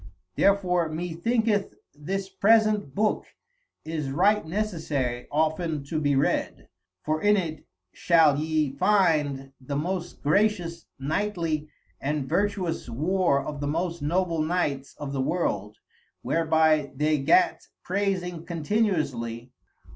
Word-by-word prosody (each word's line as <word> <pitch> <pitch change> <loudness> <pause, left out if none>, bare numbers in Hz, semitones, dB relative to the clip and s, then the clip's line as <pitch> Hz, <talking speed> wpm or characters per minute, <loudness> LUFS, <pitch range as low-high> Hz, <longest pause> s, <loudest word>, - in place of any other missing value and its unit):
Therefore 180 -4 +2
mee 165 +2 -4
thinketh 220 +3 0 0.2
this 190 +7 -4
present 210 -4 +2
booke 215 0 0 0.6
is 155 -3 -3
right 200 +9 +3
necessary 155 - -2
often 155 0 0
to 155 +3 -3
be 145 -2 +2
read, 135 - -1 0.3
for 155 0 -1
in 210 0 +4
it 160 -5 -4 0.3
shall 160 -4 +4
yee 155 -2 0
finde 145 -7 +2
the 140 +2 -5
most 175 +4 -3
gracious, 170 0 +1
knightly, 160 0 -2 0.3
and 145 -1 -2
vertuous 180 -4 -1
war 155 +3 +1
of 145 -1 -5
the 145 - -2
most 170 +3 -2
noble 165 +2 0
knights 155 -4 -1
of 145 -2 -5
the 135 - -1
world, 120 - -1 0.5
whereby 160 -2 +2
they 150 +2 +1
gat 355 - +3 0.2
praysing 185 -3 -1
continually. 150 - -1
160 Hz, 115 wpm, -26 LUFS, 145-190 Hz, 0.6 s, in